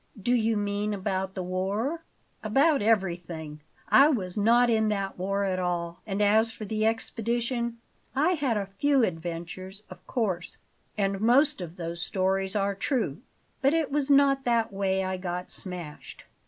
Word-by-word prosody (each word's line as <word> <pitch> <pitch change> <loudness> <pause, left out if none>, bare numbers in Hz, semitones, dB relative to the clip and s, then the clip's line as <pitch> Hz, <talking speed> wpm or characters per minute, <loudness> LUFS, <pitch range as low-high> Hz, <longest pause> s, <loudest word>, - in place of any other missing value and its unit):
"Do 240 +5 +1
you 225 -2 +2
mean 205 +1 -1
about 190 0 -2
the 185 - -3
war?" 200 - -2 0.4
"About 275 +7 +3
everything. 170 -7 -1 0.3
I 275 - +7
was 190 - -1
not 235 +4 +4
in 220 -2 +2
that 195 -3 -2
war 195 +2 0
at 185 -2 0
all; 175 -1 -2
and 200 0 0
as 220 +2 +4
for 220 - -8
the 215 +1 0
expedition, 235 +1 -1 0.4
I 295 +6 +3
had 280 -10 0
a 200 -1 -4
few 285 -3 +4
adventures, 175 +2 -4
of - - -11
course, 190 -9 -2 0.4
and 195 -1 0
most 270 +3 +4
of 170 -1 -7
those 170 -1 -5
stories 190 +2 0
are 200 -1 +1
true, 200 - -2 0.4
but 275 +4 +3
it 320 -4 0
was 290 -1 0
not 275 -1 +4
that 230 -3 +1
way 190 -1 0
I 185 0 -2
got 180 0 -5
smashed. 175 -5 -7
205 Hz, 160 wpm, -27 LUFS, 185-235 Hz, 0.4 s, I